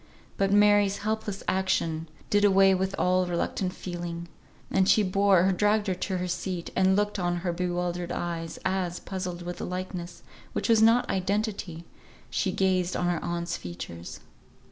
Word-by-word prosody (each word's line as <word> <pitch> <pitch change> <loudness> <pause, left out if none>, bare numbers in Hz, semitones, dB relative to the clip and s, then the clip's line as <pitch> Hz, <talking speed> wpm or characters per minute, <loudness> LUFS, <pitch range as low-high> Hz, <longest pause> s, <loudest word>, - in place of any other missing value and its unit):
But 195 0 +1
Mary's 205 -1 +5
helpless 215 -2 -2
action 165 -4 0 0.2
did 205 0 +3
away 195 -1 +6
with 190 +1 -1
all 185 0 +2
reluctant 175 +2 -1
feeling, 170 -2 -6 0.4
and 190 0 +3
she 215 - +5
bore 195 -1 +4
or - - +3
dragged 210 +3 +2
her 190 - 0
to 185 +1 -3
a 180 0 -2
seat, 180 0 -3
and 190 0 +4
looked 205 0 0
on 175 -1 0
her 175 - 0
bewildered 175 0 -2
eyes, 165 -1 -4
as, 185 -2 -1
puzzled 180 -2 -5
with 175 0 -5
the - - -4
likeness, 180 -1 -5 0.3
which - - -2
was 225 -1 +5
not 230 +2 +5
identity, 195 -3 -2 0.5
she 190 - 0
gazed 185 -1 +1
on 180 - 0
her 175 -2 -1
aunt's 170 0 -2
features. 85 -1 -8
185 Hz, 165 wpm, -27 LUFS, 175-195 Hz, 0.5 s, away